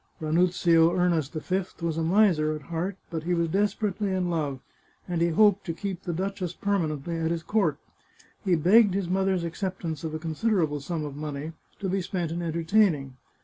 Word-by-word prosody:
Ranuzio 170 +1 +3
Ernest 170 -5 +1
V 180 +2 -3
was 165 -2 -1
a 165 - -1
miser 165 -3 +3
at 150 - -8
heart, 180 +4 -2
but 165 -2 -2
he 175 +2 0
was 170 -1 0
des 200 +5 +3
perately 205 -1 -2
in 180 -1 -1
love, 145 -5 -2 0.5
and 175 -2 -1
he 170 - +4
hoped 200 +4 +4
to 165 - -1
keep 190 -1 -4
the 175 - -3
duchess 185 0 -3
perma 200 -5 0
nently 165 +3 -4
at 160 - +1
his 165 -1 -2
court. 210 +3 +1 0.7
He 185 -4 +3
begged 195 +5 +5
his 195 -3 -1
mother's 190 0 +1
acceptance 170 -2 -4
of 160 -1 -3
a - - -1
considerable 160 -1 0
sum 155 +1 -3
of 145 -2 -6
money, 150 +1 -5 0.3
to 195 - -1
be 190 +1 0
spent 175 -3 -3
in 170 +1 -3
entertaining. 165 -4 +1
170 Hz, 190 wpm, -27 LUFS, 160-190 Hz, 0.7 s, begged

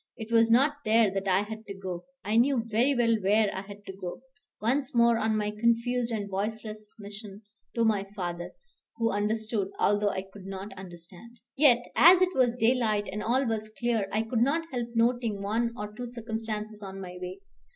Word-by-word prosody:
It 220 0 -7
was 230 0 +5
not 275 +6 +4
there 220 -3 +4
that 195 0 -2
I 190 +1 +3
had 220 +1 -7
to 200 - -6
go. 185 -2 -6 0.2
I 210 +2 0
knew 245 0 +3
very 235 +5 +2
well 230 -2 +3
where 205 +2 +2
I 190 - -3
had 205 +1 -12
to 190 - -8
go, 185 +6 -7 0.4
once 265 +4 0
more 235 -1 +5
on 220 0 +1
my 210 0 -1
confused 235 +2 +1
and 210 -3 -2
voiceless 215 +2 -4
mission 205 0 -9 0.3
to 230 -1 +2
my 205 -3 +2
father, 175 -2 -4 0.4
who 230 -1 +1
understood, 210 0 -1
although 205 0 +2
I 190 -1 -3
could 195 0 -13
not 195 +1 -6
understand. 185 +5 -12 0.2
Yet 255 -4 +5
as 350 +2 +8
it 370 0 +2
was 250 -4 +2
daylight, 225 -3 +2
and 210 +2 -4
all 260 +4 +1
was 220 -2 -2
clear, 235 -4 0
I 215 +2 +1
could 225 0 -1
not 305 +7 +2
help 240 -2 -2
noting 230 -3 +1
one 230 +4 0
or 210 -1 -6
two 245 +2 -6
circumstances 220 -2 -5
on 195 -1 -7
my 180 -1 -8
way. 180 0 -6
220 Hz, 195 wpm, -28 LUFS, 200-235 Hz, 0.4 s, as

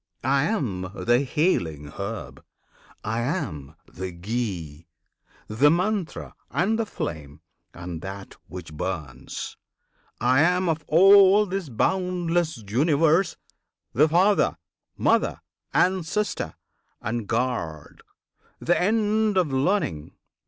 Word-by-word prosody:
I 135 +3 +2
am 105 - -2
the 120 0 +2
healing 90 - 0
herb! 95 - -6 0.6
I 110 +2 -2
am 120 - -3
the 95 0 -6
ghee, 85 -5 -4 0.6
The 120 +8 +4
Mantra, 180 +2 -1 0.2
and 215 +6 +1
the 225 - -1
flame, 75 - -6 0.3
and 85 -1 -7
that 95 +2 -8
which 80 -2 -9
burns! 75 -7 -5 0.6
I 130 +4 +3
am 180 +2 +3
of 160 -1 -1
all 195 +4 +7
this 190 -4 -4
boundless 175 - 0
Universe 155 - +2 0.6
The 150 +6 +4
Father, 185 - +3 0.4
Mother, - - +2 0.3
Ancestor, 185 - 0 0.4
and 110 0 -3
Guard! 110 - -3 0.6
The 175 +2 +1
end 215 +1 +2
of 165 -7 +2
Learning! 130 - 0
130 Hz, 105 wpm, -25 LUFS, -, 0.6 s, all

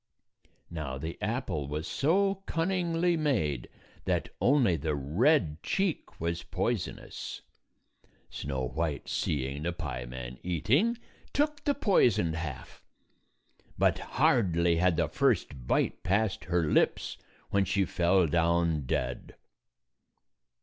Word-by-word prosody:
Now 75 -6 -4
the 80 +5 -5
apple 110 - -2
was 75 +2 -3
so 195 +6 +1
cunningly 170 0 +1
made 110 - 0 0.4
that - - 0
only 125 - +4
the 75 0 -1
red 80 - +2
cheek 190 -4 -2
was 85 +1 -2
poisonous. - - -3 0.9
Snow 65 -2 -3
White, 80 +1 -2
seeing 70 0 -1
the 85 +3 -1
pieman 65 -5 -6
eating, 130 - +2 0.4
took 295 +1 0
the 285 - +2
poisoned 110 - +3
half. 80 -5 -6 1.0
But - - +3 0.2
hardly 85 -7 +3
had 90 -1 +3
the - - +2
first 65 -3 0
bite - - +1
passed 100 +2 0
her 85 -1 +1
lips - - +1 0.3
when 100 -1 +3
she 100 0 +1
fell 90 +1 +3
down 85 -2 +1
dead. 65 0 -2
85 Hz, 110 wpm, -29 LUFS, -, 1.0 s, only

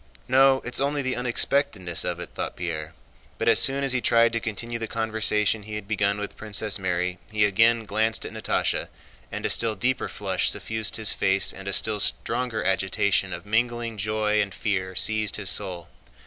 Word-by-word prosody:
"No, 135 +1 +5
it's 120 - -1
only 140 0 0
the 130 -1 -1
unexpectedness 125 - 0
of 85 -1 -3
it," 90 - -7
thought - - -4
Pierre. 80 -2 -5 0.4
But - - -2
as - - +5
soon 140 +1 +2
as 135 - +2
he 125 - 0
tried 115 -1 +4
to 115 - 0
continue 115 +1 -4
the 115 - -4
conversation 110 -1 0
he 105 +1 -8
had 105 -2 -6
begun 100 -1 0
with 105 -1 -5
Princess 105 -1 -1
Mary 90 -1 -2
he 105 -1 +3
again 115 +3 +3
glanced 110 +2 0
at - - -6
Natásha, - - -1 0.4
and - - -5
a - - +2
still 115 -2 +3
deeper 125 +6 -1
flush 95 -3 0
suffused 110 -1 -1
his 110 -2 +1
face 95 0 +2
and 95 +1 -10
a - - -1
still 105 +1 +2
stronger 115 +1 -1
agitation 95 +1 +1
of 90 +2 -7
mingled 115 +1 -1
joy 105 +1 +1
and 100 -3 -4
fear 95 -3 -2
seized 110 +2 0
his 100 -4 0
soul. 90 -1 -2
105 Hz, 190 wpm, -25 LUFS, 95-115 Hz, 0.4 s, No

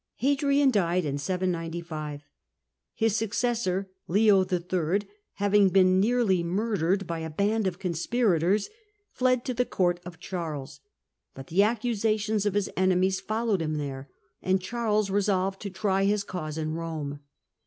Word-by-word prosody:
Hadrian 280 +1 +2
died 180 -5 +1
in 140 -1 -2
795. 165 -3 -3 0.7
His 225 -2 +1
suc 225 -1 -1
cessor, 220 -6 0 0.2
Leo 200 +1 +4
III., 180 +1 -1 0.3
having 205 -1 +3
been 185 0 +4
nearly 215 -4 +2
murdered 195 0 0
by 165 -1 -4
a 160 0 -4
band 205 +6 0
of 180 -2 -3
conspirators, 190 +1 +1 0.4
fled 255 -1 +1
to 255 - -1
the 250 +1 +1
court 175 -6 0
of 175 -2 -10
Charles; 160 -7 -5 0.6
but 135 - -8
the 180 +5 +3
accusations 215 -1 +1
of 205 - -1
his 205 -2 +1
enemies 185 0 +2
followed 220 -3 -1
him 155 -1 -1
there, 140 -2 -5 0.3
and 190 +1 +2
Charles 215 0 -1
resolved 195 -1 0
to 205 - -4
try 195 0 0
his 205 0 +1
cause 160 -6 -5
in 155 0 -2
Rome. 160 -3 -4
190 Hz, 145 wpm, -27 LUFS, 170-215 Hz, 0.7 s, Leo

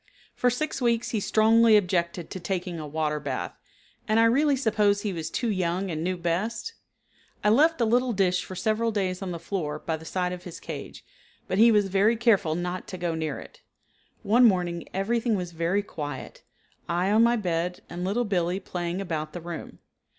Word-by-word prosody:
For 250 - +2
six 275 +3 -2
weeks 235 -1 +1
he 220 - 0
strongly 220 +2 +5
objected 175 -3 -1
to 185 - -5
taking 175 -1 -3
a 155 - -6
water 150 0 -1
bath, 130 -11 -4 0.5
and 215 +1 +3
I - - +6
really 280 +5 +4
suppose 210 -5 +2
he 205 -2 -2
was 160 -2 -4
too 235 +6 -1
young 185 0 -1
and 155 0 -3
knew 185 +1 -1
best. 190 - -2 0.7
I 210 - +4
left 305 +8 +4
a 235 - +3
little 245 +3 +2
dish 185 -4 +1
for 185 - -8
several 220 +4 0
days 190 -3 -1
on 190 - -4
the 175 - -4
floor 160 -4 -3
by 160 +1 -3
the 160 - -13
side 180 +1 -1
of 180 0 -8
his 175 -1 -8
cage, - - -8 0.4
but 185 - -1
he 230 +1 +7
was 210 -2 +3
very 200 +4 +3
careful 210 -9 +2
not 180 +1 -4
to 185 - -6
go 175 -2 -2
near 160 -3 -3
it. - - -12 0.6
One 240 +4 +5
morning 175 -5 +1
everything 225 +4 0
was 180 -3 -3
very 170 +5 0
quiet, 145 -8 -7 0.5
I 175 +3 +1
on 215 +2 +5
my 235 +1 +5
bed 180 -4 -2
and 175 +1 -6
Little 210 +6 0
Billee 180 -2 0
playing 180 -1 -4
about 155 -4 -4
the 175 - -6
room. 170 0 -7
185 Hz, 195 wpm, -26 LUFS, 170-220 Hz, 0.7 s, he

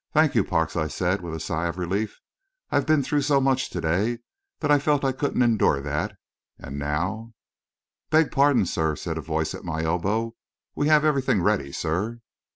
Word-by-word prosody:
"Thank 155 -1 +4
you, - - +3
Parks," 80 -3 -1
I 80 -2 0
said, 90 +4 -1
with 85 -2 -5
a - - -5
sigh 80 +2 -2
of 85 +1 -4
relief. 100 +4 -2 0.5
"I've 145 - +1
been 155 -2 +4
through 145 +2 0
so 140 0 +3
much 130 -1 +1
to 90 - -4
day, 95 +9 0 0.4
that 150 -2 0
I 145 - +6
felt 145 -1 +1
I 135 - +3
couldn't 130 -1 0
endure 110 -11 +3
that; 75 +1 -3 0.4
and 70 +2 -7
now 95 +11 -2 0.4
" - - -67
"Beg 155 0 +3
pardon, 140 -6 +4
sir," 80 -3 0
said 80 0 -4
a - - -4
voice 80 0 -2
at - - -8
my 80 -2 -3
elbow; 100 +8 0 0.4
"we 145 - 0
have 155 0 +5
everything 135 - +2
ready, 90 -9 +1
sir." 100 +12 -2
100 Hz, 195 wpm, -25 LUFS, 80-135 Hz, 0.5 s, I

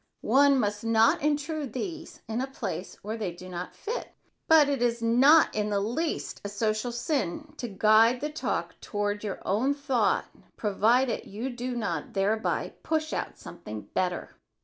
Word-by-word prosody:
One 280 0 +5
must 210 -2 -1
not 225 0 +4
intrude 295 -2 -1
these 330 +4 -6
in 225 +2 -2
a 265 - -2
place 210 -8 -5
where 215 +3 -4
they 205 -5 -2
do 180 +2 -11
not 180 0 -6
fit, 465 +4 -5 0.4
but 315 -3 +7
it 280 -3 -1
is 235 -1 +1
not 270 +8 +6
in 210 0 -1
the 200 -1 +1
least 245 +11 -2
a 205 - -4
social 215 +3 -1
sin 270 - -2
to 240 - -4
guide 220 +4 +4
the 300 +2 -3
talk 310 - -3
toward 205 0 -2
your 205 -3 -4
own 250 +9 +1
thought 280 -4 +1 0.3
provided 230 +4 +2
you 230 +7 -4
do 245 +1 -4
not 175 -10 -3
thereby 210 +3 0
push 315 -1 -1
out - - -3
something 105 0 -9
better. 180 -1 -1
230 Hz, 165 wpm, -28 LUFS, 205-280 Hz, 0.4 s, but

